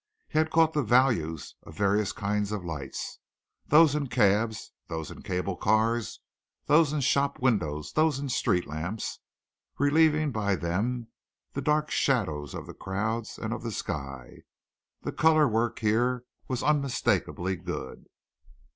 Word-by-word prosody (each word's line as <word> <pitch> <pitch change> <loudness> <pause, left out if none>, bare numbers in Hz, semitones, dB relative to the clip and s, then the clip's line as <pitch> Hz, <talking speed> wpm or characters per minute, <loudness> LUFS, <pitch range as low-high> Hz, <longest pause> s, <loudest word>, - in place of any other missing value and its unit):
He 155 - 0
had 160 0 +2
caught 160 0 +4
the 150 - +2
values 110 - +2
of 80 - -13
various 100 0 +2
kinds 105 0 -1
of 100 -4 -4
lights, 75 -5 -5 0.5
those 155 -1 +6
in 150 -2 -1
cabs, 110 -2 +1 0.2
those 80 -2 -5
in - - -10
cable 90 +1 -2
cars, 110 +3 +1 0.4
those 150 0 +4
in 150 -1 -1
shop 140 +1 +1
windows, 85 - 0
those 155 -2 +3
in 140 - -4
the - - -4
street 90 -6 +1
lamp 85 +8 -4 0.8
relieving 155 +1 +3
by 100 -4 0
them 110 +8 -2 0.4
the 140 - -3
black 150 +2 +1
shadows 80 - 0
of - - -6
the - - -9
crowds 110 +4 -3
and - - -3
of - - -5
the - - -4
sky. 70 -4 -6 0.6
The - - -2
color 155 -1 +4
work 115 0 0
here 120 +3 +1 0.2
was 130 -2 -2
unmistakably 135 -9 +1
good. 85 -6 -7
115 Hz, 145 wpm, -28 LUFS, 95-140 Hz, 0.8 s, those